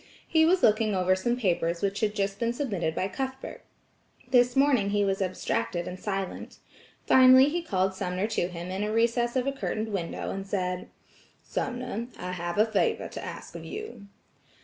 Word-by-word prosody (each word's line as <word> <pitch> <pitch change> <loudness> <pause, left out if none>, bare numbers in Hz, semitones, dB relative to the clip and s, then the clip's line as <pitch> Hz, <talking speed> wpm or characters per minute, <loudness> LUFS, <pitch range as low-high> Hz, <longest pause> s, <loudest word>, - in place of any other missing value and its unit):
He 320 -1 +4
was 365 +2 +3
looking 215 -1 +3
over 185 0 +3
some 240 +6 -1
papers 170 -6 0
which 200 0 0
had 210 -1 0
just 195 -1 -1
been 235 0 0
submitted 195 - -2
by 190 - 0
Cuthbert. 265 - -5 0.7
This 245 -1 +4
morning 270 -7 +3
he 205 0 +2
was 195 0 0
abstracted 185 -1 -2
and 185 - -6
silent. 195 -2 -4 0.5
Finally 260 +1 +7
he 345 +3 -1
called 190 - 0
Sumner 185 +1 -2
to 215 -5 0
him 175 0 -7
in 190 +2 -2
a 210 - -1
recess 235 +2 +1
of 255 -1 +1
a 275 - +1
curtained 225 -5 -3
window 185 -5 -3
and 195 0 -5
said: 180 -2 -2 0.6
"Sumner, 245 -2 -3
I 180 0 -5
have 175 0 -4
a 215 - +5
favor 220 -3 0
to - - -7
ask - - -8
of - - -8
you." 430 - -8
205 Hz, 180 wpm, -27 LUFS, 185-245 Hz, 0.7 s, Finally